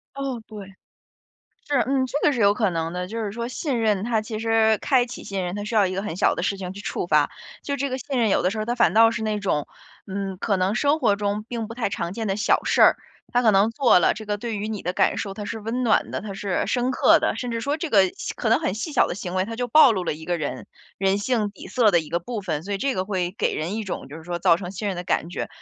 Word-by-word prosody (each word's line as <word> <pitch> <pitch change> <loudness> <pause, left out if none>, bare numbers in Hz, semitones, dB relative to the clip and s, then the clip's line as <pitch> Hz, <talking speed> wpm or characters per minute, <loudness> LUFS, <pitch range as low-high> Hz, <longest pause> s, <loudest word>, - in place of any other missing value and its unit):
哦， 270 -4 -4
对。 200 -3 -10 1.0
是， 290 - +1
嗯， 265 0 +1
这 285 - -2
个 300 - +4
是 245 - -2
有 200 0 +5
可 215 -3 +1
能 165 -1 -2
的， 180 0 -3
就 225 +3 -4
是 205 - -3
说 235 +2 -4
信 255 -1 -2
任 210 -3 +1
它 230 -2 +1
其 215 0 -5
实 225 -1 +3
开 255 -1 +3
启 245 - -8
信 195 -1 -3
任， 175 0 -3
它 205 0 -4
需 225 +2 -5
要 205 -3 +4
一 185 - -3
个 195 - -2
很 210 -6 -5
小 190 - +3
的 - - -4
事 200 - 0
情 185 -1 -6
去 200 - -9
触 180 - -3
发， 150 -3 +3 0.3
就 285 - -4
是 - - -2
这 280 -1 -2
个 260 - -2
信 270 -1 -3
任 225 -2 +3
有 - - +2
的 180 - +2
时 215 - -4
候 215 - -1
它 240 +2 -1
反 235 -9 +3
倒 225 +1 +7
是 230 0 -4
那 215 -1 -1
种， 170 -8 -1 0.4
嗯， 195 -1 -4
可 200 0 0
能 185 +3 0
生 290 +4 +2
活 205 - +3
中 205 +1 -2
并 230 -2 -3
不 230 - -7
太 240 -4 -1
常 175 -3 -3
见 225 +1 -4
的 195 -1 -1
小 210 - +2
事 - - +3
儿， - - +7 0.4
他 245 - +3
可 220 -3 +5
能 200 +3 +4
做 235 -5 +4
了， - - +3
这 215 0 -9
个 205 0 -1
对 225 0 -4
于 205 - -3
你 215 -2 -4
的 180 - -2
感 - - +2
受， 195 - -3
它 210 - -6
是 220 +2 -5
温 235 +4 -2
暖 220 - +2
的， - - -3
它 205 0 -6
是 195 -2 -2
深 250 0 0
刻 - - +5
的， - - 0
甚 245 - -4
至 230 - -2
说 280 +5 -1
这 325 +1 -4
个 200 -8 +5 0.3
可 225 - -2
能 225 - +4
很 185 - -2
细 310 +9 -4
小 - - +4
的 - - -4
行 180 -1 -6
为， 185 - +2
它 225 +3 -6
就 245 +1 -3
暴 280 -1 +7
露 190 -4 -2
了 170 - -1
一 160 +1 -9
个 175 -1 -1
人， 150 -3 -4 0.3
人 195 +1 +2
性 215 -1 0
底 - - -11
色 230 -5 +3
的 175 - +4
一 155 - -10
个 170 - 0
部 220 +4 -5
分， 160 -5 -3
所 200 +1 -3
以 - - -2
这 270 +4 0
个 185 - -1
会 185 -3 -2
给 - - +1
人 170 +7 -3
一 220 - -3
种， 185 - -5
就 145 - -9
是 160 - -11
说 175 0 -3
造 175 -3 +5
成 180 0 -7
信 205 +2 -3
任 190 - -3
的 175 - -5
感 170 - 0
觉。 - - -4
210 Hz, 325 characters per minute, -24 LUFS, 190-235 Hz, 1.0 s, 倒